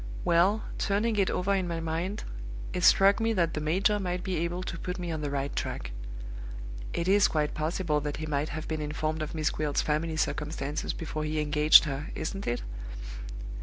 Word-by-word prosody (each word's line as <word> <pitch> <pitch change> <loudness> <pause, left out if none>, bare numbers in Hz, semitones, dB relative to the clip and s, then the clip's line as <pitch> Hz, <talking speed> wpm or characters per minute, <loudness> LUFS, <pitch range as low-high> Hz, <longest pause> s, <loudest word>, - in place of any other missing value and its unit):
Well, 185 +6 +4 0.2
turning 215 +3 +1
it 195 -2 +3
over 195 +2 +1
in 190 -2 +1
my 170 -1 -2
mind, 165 +5 -2 0.5
it 180 - -1
struck 195 +2 +6
me 225 0 +2
that 170 -5 +1
the 150 - -2
major 190 +7 +2
might 180 -2 -2
be 185 -3 -1
able 170 +2 -1
to 170 -2 -5
put 180 0 -4
me 175 -2 -3
on 160 -1 -3
the 145 - -2
right 140 0 -2
tack. - - -3 1.0
It 170 - -1
is 200 +1 +6
quite 150 -2 0
possible 155 0 0
that 145 0 -3
he 155 - -4
might 150 0 -1
have 155 +1 -5
been 155 -1 -2
informed 155 +1 -2
of 155 +1 -4
Miss 155 -1 +1
Gwilt's 150 -2 0
family 155 +1 0
circumstances 150 -1 -1
before 155 -1 -4
he 155 0 -1
engaged 150 0 +7
her, 145 -1 -3
isn't 195 +5 -4
it?" 120 0 -1
160 Hz, 195 wpm, -29 LUFS, 150-185 Hz, 1.0 s, engaged